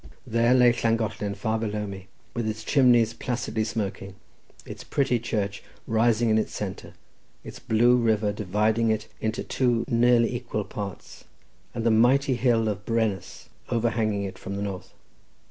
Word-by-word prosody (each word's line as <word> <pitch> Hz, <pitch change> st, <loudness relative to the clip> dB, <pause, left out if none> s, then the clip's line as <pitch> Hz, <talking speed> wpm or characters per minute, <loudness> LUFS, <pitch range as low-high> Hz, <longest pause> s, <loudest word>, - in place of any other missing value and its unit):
There 115 Hz, +1 st, +3 dB
lay 125 Hz, -1 st, +6 dB
Llangollen 110 Hz, -3 st, -1 dB
far 110 Hz, +2 st, -1 dB
below 105 Hz, -1 st, -2 dB
me, 95 Hz, -1 st, -8 dB, 0.3 s
with 120 Hz, -2 st, -2 dB
its 110 Hz, 0 st, -4 dB
chimneys 120 Hz, -4 st, +4 dB
placidly 115 Hz, -2 st, -2 dB
smoking, 100 Hz, -3 st, -4 dB, 0.5 s
its -, -, -9 dB
pretty 135 Hz, -4 st, 0 dB
church 105 Hz, -3 st, -3 dB, 0.2 s
rising 115 Hz, 0 st, +2 dB
in 110 Hz, -, +4 dB
its -, -, -3 dB
centre, -, -, -6 dB, 0.5 s
its -, -, -9 dB
blue 120 Hz, +3 st, +3 dB
river 110 Hz, -3 st, +1 dB
dividing 105 Hz, +3 st, +1 dB
it 110 Hz, -1 st, 0 dB
into 110 Hz, +1 st, -2 dB
two 120 Hz, -3 st, 0 dB
nearly 120 Hz, -1 st, +3 dB
equal 120 Hz, -3 st, -3 dB
parts, 100 Hz, -2 st, -8 dB, 0.5 s
and 115 Hz, -, -2 dB
the 115 Hz, -, +4 dB
mighty 130 Hz, +5 st, +4 dB
hill 120 Hz, -2 st, +2 dB
of 105 Hz, -1 st, -3 dB
Brennus, 110 Hz, -4 st, -2 dB, 0.2 s
overhanging 115 Hz, -3 st, 0 dB
it 95 Hz, -1 st, -6 dB
from 100 Hz, +1 st, -6 dB
the 100 Hz, -, -3 dB
north. 95 Hz, -3 st, -6 dB
110 Hz, 150 wpm, -25 LUFS, 105-120 Hz, 0.5 s, lay